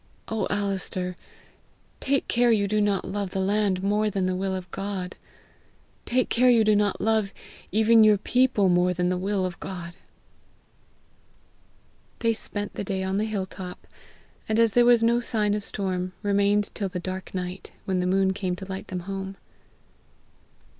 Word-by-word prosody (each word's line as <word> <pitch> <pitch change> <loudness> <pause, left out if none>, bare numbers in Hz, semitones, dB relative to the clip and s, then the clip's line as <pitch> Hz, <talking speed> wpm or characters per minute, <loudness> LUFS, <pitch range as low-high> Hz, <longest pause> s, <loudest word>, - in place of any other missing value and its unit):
Oh 220 -1 -1
Alister, 190 -2 -1 0.8
take 275 0 0
care 240 0 +3
you 205 -3 +2
do 210 +1 +1
not 205 -2 +1
love 200 0 -3
the 190 - -3
land 195 -1 +1
more 210 +2 +2
than 195 -2 -1
the 185 0 0
will 190 +1 -1
of 185 -2 -7
God! 195 -2 -4 0.9
Take 250 +1 +1
care 250 +2 +4
you 235 -2 +5
do 215 -1 +4
not 205 -1 +1
love 220 -2 +1 0.4
even 220 +1 +5
your 215 -1 +6
people 245 -2 +2
more 180 0 +3
than 180 0 +1
the 180 - 0
will 195 0 0
of 180 -1 -5
God." 180 -3 -6 2.2
They 230 -1 +1
spent 205 -1 -5
the - - -4
day 190 -1 -2
on 190 +1 -1
the 215 - +1
hill 210 -3 -2
top, 185 -1 -9 0.6
and 220 - +1
as 230 -2 +4
there 240 0 +5
was 240 -1 +5
no 235 +1 +4
sign 215 -4 0
of 210 -1 -2
storm, 185 -3 -2
remained 205 0 +2
till 200 -2 -2
the 180 - -4
dark 185 +1 -6
night, 180 0 -5
when 190 -1 0
the 180 - 0
moon 190 +1 +2
came 185 -2 -2
to 190 - -8
light 190 0 -6
them 180 -1 -4
home. 195 +1 -5
200 Hz, 175 wpm, -26 LUFS, 185-215 Hz, 2.2 s, your